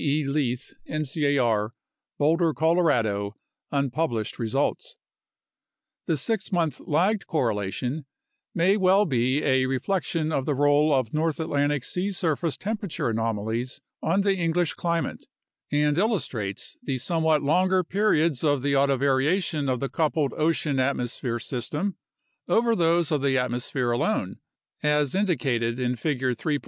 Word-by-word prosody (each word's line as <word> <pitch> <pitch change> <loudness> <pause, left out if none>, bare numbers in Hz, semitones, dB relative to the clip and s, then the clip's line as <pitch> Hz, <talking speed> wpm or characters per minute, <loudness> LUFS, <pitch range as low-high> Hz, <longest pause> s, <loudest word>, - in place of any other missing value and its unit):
E. 150 +1 +1
Leith, 135 -3 -2 0.2
ncar, 140 -8 0 0.4
Boulder, 160 +2 +2
Colorado, 120 - +1 0.4
un 140 -2 0
published 120 -8 -2
results). 140 - -1 1.1
The 165 -4 +1
6 205 - -2
month 165 -7 0
lagged 190 +7 0
correlation 125 - -2 0.5
may 185 +4 +3
well 195 +1 +4
be 130 0 +1
a 130 -1 +2
re 130 0 0
flection 165 0 -1
of 135 -3 -1
the 145 - +1
role 145 +2 +3
of 130 -5 +1
North 155 +1 0
Atlantic 145 -3 0
sea 180 +8 -2
surface 165 -4 -1
temperature 205 - -3
anomalies 115 +2 -2 0.2
on 195 - +2
the 200 0 +2
English 170 -1 0
climate 170 -1 -2 0.4
and 150 +1 +2
illustrates 135 - -2
the 135 -2 -2
somewhat 160 +2 +1
longer 185 +5 +3
periods 170 -7 +1
of 145 -4 +2
the 140 0 +1
autovariation 140 +3 +2
of 125 - -1
the 135 - -1
coupled 155 -3 0
ocean 155 -3 +1
atmosphere 125 -2 -1
system 145 - -3 0.5
over 230 0 +3
those 170 -3 +2
of 150 -3 +1
the 135 -1 +2
atmosphere 125 0 -1
alone, 120 - -1 0.4
as 150 -2 +2
indicated 130 - 0
in 125 0 0
Figure 130 0 -1
3. 145 +6 -1
145 Hz, 135 wpm, -25 LUFS, 130-165 Hz, 1.1 s, well